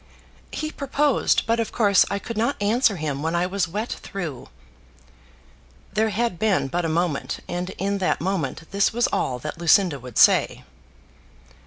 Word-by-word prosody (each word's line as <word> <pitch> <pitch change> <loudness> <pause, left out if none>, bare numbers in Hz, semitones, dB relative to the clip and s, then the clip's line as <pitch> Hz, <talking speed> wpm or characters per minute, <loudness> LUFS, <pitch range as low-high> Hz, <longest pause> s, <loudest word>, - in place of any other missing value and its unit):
"He 310 0 -4
proposed; 280 -1 +1
but 230 +1 +1
of 230 - -2
course 205 -4 +4
I 200 - -1
could 230 +3 -6
not 235 +6 0
answer 215 +2 +2
him 150 -4 -3
when 165 +2 -1
I 175 +1 +1
was 185 -2 -1
wet 210 +7 -4
through." 165 - -6 1.4
There 220 +2 +2
had 215 -4 -1
been 195 -10 +1
but 175 +4 -1
a - - 0
moment, 165 -3 -1
and 175 +1 -3
in 200 +1 -1
that 185 - 0
moment 165 -4 -3
this 200 0 +2
was 240 +1 +1
all 125 - 0
that 150 +5 -7
Lucinda 170 -2 +3
would 125 -2 -9
say. - - +4
195 Hz, 165 wpm, -23 LUFS, 165-220 Hz, 1.4 s, course